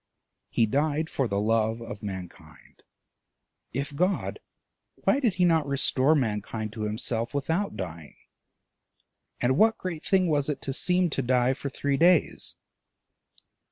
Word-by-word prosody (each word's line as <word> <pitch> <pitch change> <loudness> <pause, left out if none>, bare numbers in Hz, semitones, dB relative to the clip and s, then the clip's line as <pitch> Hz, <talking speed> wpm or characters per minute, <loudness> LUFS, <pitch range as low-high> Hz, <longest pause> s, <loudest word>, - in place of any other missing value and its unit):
He 115 - +2
died 150 +6 0
for 135 - 0
love 110 +2 +1
of 115 -3 -8
mankind: 90 -6 -9 0.9
if 140 +3 -4
God, 180 +6 0 0.6
why 275 - +1
did 235 -9 +1
he 180 0 +3
not 160 -4 +3
restore 140 +1 +2
mankind 110 -3 -2
to 110 - -6
himself 115 +3 -2
without 165 +8 -1
dying? 85 -4 -7 1.2
and 130 +3 +1
what 220 0 +5
great 170 -4 -5
thing 190 -2 +3
was 145 -2 +1
it 145 -2 -2
to 135 - -3
seem 180 +3 +1
to 135 - 0
die 125 0 +2
for 140 - -5
three 140 +1 -1
days? 170 0 +3
135 Hz, 135 wpm, -27 LUFS, 110-160 Hz, 1.2 s, what